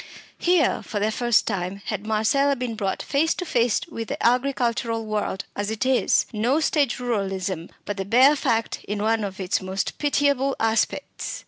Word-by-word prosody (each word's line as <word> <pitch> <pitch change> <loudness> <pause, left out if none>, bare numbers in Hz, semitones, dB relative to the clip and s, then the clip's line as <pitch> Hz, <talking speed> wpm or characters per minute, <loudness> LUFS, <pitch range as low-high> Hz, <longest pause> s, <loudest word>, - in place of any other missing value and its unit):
Here, 350 -2 +2
for 210 - -4
the 215 +2 +1
first 240 0 +2
time, 195 -1 -3
had 210 0 -4
Marcella 225 +6 +2
been 250 -2 -3
brought 200 -3 -2
face 315 +3 +1
to 360 - -4
face 235 -7 +1
with 230 -9 -6
the - - -3
agricultural 240 -2 +1
world 210 -2 -2
as 205 0 -2
it 220 +3 -2
is 260 -1 +3
no 240 +8 +1
stage 290 -5 +1
ruralism, 195 -7 -2 0.2
but 205 - -4
the 195 - -2
bare 255 +8 +6
fact 230 -6 -1
in 205 0 -3
one 225 0 +1
of 195 -1 -5
its 185 +1 0
most 190 +1 -3
pitiful 280 -2 +1
aspects. 225 0 -1
225 Hz, 175 wpm, -24 LUFS, 205-265 Hz, 0.2 s, bare